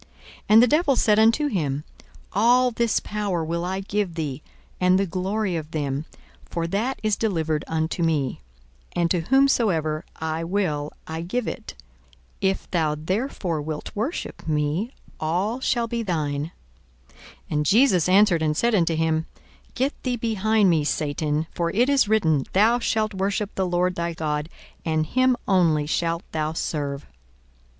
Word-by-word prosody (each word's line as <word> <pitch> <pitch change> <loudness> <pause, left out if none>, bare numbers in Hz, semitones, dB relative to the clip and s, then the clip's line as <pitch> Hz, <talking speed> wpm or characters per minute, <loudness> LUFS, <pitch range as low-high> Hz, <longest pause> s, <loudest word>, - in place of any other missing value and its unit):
42:004:006 - - -26 0.4
And 220 +2 +8
the - - +5
devil 300 +1 +3
said 215 -3 +3
unto 230 +7 +4
him, 150 - -1 0.5
All 245 +5 +4
this 235 -1 +1
power 200 -6 -2
will 170 +1 -2
I 190 +2 -2
give 195 -3 -2
thee, 150 -4 -3 0.4
and 180 0 +4
the 195 - +2
glory 190 +2 -2
of 155 -2 -4
them: 145 -2 -2 0.4
for 170 -1 -3
that 215 +10 -1
is 215 -1 +2
delivered 160 -9 -1
unto 160 +2 -1
me; 155 -6 0 0.5
and 170 -1 +1
to 180 - +2
whomsoever 180 - +2
I 160 +1 -3
will 165 -5 -1
I 160 +1 -5
give 215 +8 -2
it. - - -6 0.7
42:004:007 190 - +4
If 190 - -4
thou 160 -4 +1
therefore 185 - -2
wilt 150 0 -6
worship 225 - -4
me, 155 - 0 0.3
all 185 +10 -1
shall 240 -3 0
be 235 0 -2
thine. 155 -6 -2 0.6
42:004:008 - - -27 0.3
And 150 0 0
Jesus 195 - +4
answered 190 -3 +5
and 155 -1 0
said 235 0 +2
unto 170 -5 +2
him, 160 0 0 0.5
Get 270 +3 0
thee 250 -2 -1
behind 220 -3 +2
me, 160 -3 +2
Satan: 150 +1 -1
for 170 -1 -1
it 235 +8 +2
is 275 -7 +3
written, 160 -11 +2
Thou 225 +5 +4
shalt 220 -2 0
worship 200 +2 -1
the 190 -1 -1
Lord 180 +1 +1
thy 170 -1 -2
God, 150 -1 -2 0.3
and 155 -1 0
him 255 +6 +2
only 165 -6 +3
shalt 165 +2 -1
thou 155 0 -1
serve. 145 -3 -3
175 Hz, 160 wpm, -24 LUFS, 155-215 Hz, 0.7 s, And